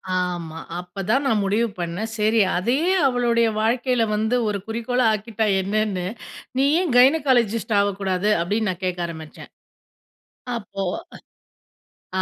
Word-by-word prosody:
ஆமா. 175 -3 -3 0.2
அப்பதான் 195 +9 -1
நான் 220 -5 +2
முடிவு 215 +4 +1
பண்னேன். 180 +6 -3
சரி, 215 +2 +3 0.2
அதையும் 300 - +1
அவளுடைய 235 -2 +2
வாழ்க்கையில 245 +1 +1
வந்து 220 +3 0
ஒரு 205 -1 -1
குறிக்கோளா 235 +2 0
ஆக்கிட்டா 220 +1 -2 0.2
என்னன்னு, 200 -2 -1 0.5
"நீ 270 - +3 0.2
ஏன் 325 -9 -1
கைனகாலஜிஸ்ட் 245 -6 +3
ஆவக்கூடாது?" 200 0 0
அப்பிடின்னு 210 +4 0
நான் 185 +1 -9
கேட்க 180 -1 -2
ஆரம்பிச்சேன். 160 -2 -10 1.1
அப்போ 200 -2 -6 1.4
அ - - +2
215 Hz, 120 wpm, -22 LUFS, 190-240 Hz, 1.4 s, சரி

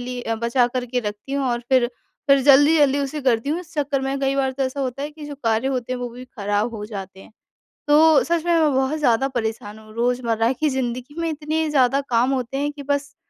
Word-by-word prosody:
ली 245 0 -5
अ, 225 - -2
बचा 235 +2 +1
कर 250 - -1
के 250 +1 -1
रखती 210 +4 -6
हूँ 280 -1 0
और 240 -1 -1
फिर 255 -2 +4 0.4
फिर 275 0 +6
जल्दी-जल्दी 290 0 +5
उसे 280 +2 -3
करती 250 0 +1
हूँ। 335 +4 -1
इस 340 -2 -15
चक्कर 285 -2 0
में 270 +1 -2
कई 270 0 +1
बार 265 -1 +1
तो 270 - -3
ऐसा 265 +1 -2
होता 265 +1 -3
है 295 - -4
कि 300 0 -11
जो 290 - -7
कार्य 225 +2 +1
होते 255 -2 -2
हैं, 250 - -4
वो 245 - -3
भी 245 +2 -10
ख़राब 205 -1 -2
हो 210 - -5
जाते 195 -3 -8
हैं। - - -16 0.6
तो 305 +1 +6
सच 335 -1 0
में 345 - +2
मैं 305 -3 +3
बहुत 265 +3 +1
ज़्यादा 265 -1 +2
परेशान 220 -4 -4
हूँ। 215 0 -15
रोज़मर्रा 235 -1 +1
की 305 +4 0
ज़िंदगी 255 +1 -3
में 330 - -1
इतने 310 +1 -2
ज़्यादा 275 -1 +3
काम 245 +2 +2
होते 255 0 -3
हैं 290 +1 -1
कि 290 -1 -10
बस 285 0 -2
265 Hz, 240 wpm, -22 LUFS, 240-285 Hz, 0.6 s, फिर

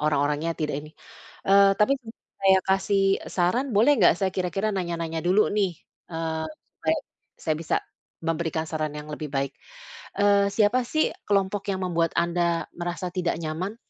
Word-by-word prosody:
orang-orangnya 150 +2 +1
tidak 155 -3 -2
ini. 150 +1 -12 0.6
Eee, 195 0 +6
tapi 210 +6 +3 0.5
saya 190 -1 +6
kasih 195 +1 +2 0.3
saran 185 +9 +1
boleh 235 +8 +6
nggak, 175 -4 +6
saya 190 -1 +1
kira-kira 185 +3 -1
nanya-nanya 170 -3 -2
dulu 195 +4 +4
nih, 195 -3 +2 0.4
eee, 160 -1 -2 0.3
supaya 160 0 0 0.5
saya 155 - +1
bisa - - 0 0.5
memberikan 165 -1 -1
saran 155 -1 -2
yang 150 0 -8
lebih 150 0 -5
baik. 140 0 -1 0.7
Eee, 200 0 +4
siapa 225 +4 +3
sih, 310 0 +1 0.2
kelompok 200 0 +1
yang 190 - -2
membuat 170 -2 +1
Anda 170 0 +1
merasa 175 +1 -3
tidak 180 -1 -1
nyaman? 170 +6 -3
175 Hz, 145 wpm, -25 LUFS, 160-195 Hz, 0.7 s, Eee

